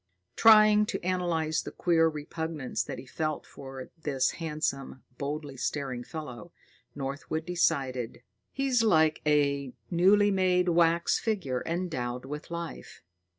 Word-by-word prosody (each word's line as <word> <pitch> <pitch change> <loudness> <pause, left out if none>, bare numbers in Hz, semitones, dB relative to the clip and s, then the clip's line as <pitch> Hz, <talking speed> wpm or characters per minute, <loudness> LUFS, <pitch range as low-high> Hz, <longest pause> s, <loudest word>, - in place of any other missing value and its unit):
Trying 215 -1 +7
to - - -4
analyze 170 -4 0
the - - -7
queer 165 -2 +3
repugnance 155 -2 -4
that - - -6
he - - -9
felt 155 +3 -3
for 135 -1 -10
this 135 -4 +1
handsome, 150 -4 -3 0.2
boldly 145 -1 -4
staring 130 -2 -3
fellow, 155 +2 -8 0.4
Northwood 140 +3 -4
decided: 130 -9 -1 0.3
"He's 270 -3 +1
like 160 -8 +3
a 140 -3 +2 0.2
newly 200 +4 +5
made 180 -2 +2
wax 170 0 +3
figure 180 - -2
endowed 130 -8 -3
with 150 +2 -7
life." 170 - -7
155 Hz, 120 wpm, -29 LUFS, 135-180 Hz, 0.4 s, Trying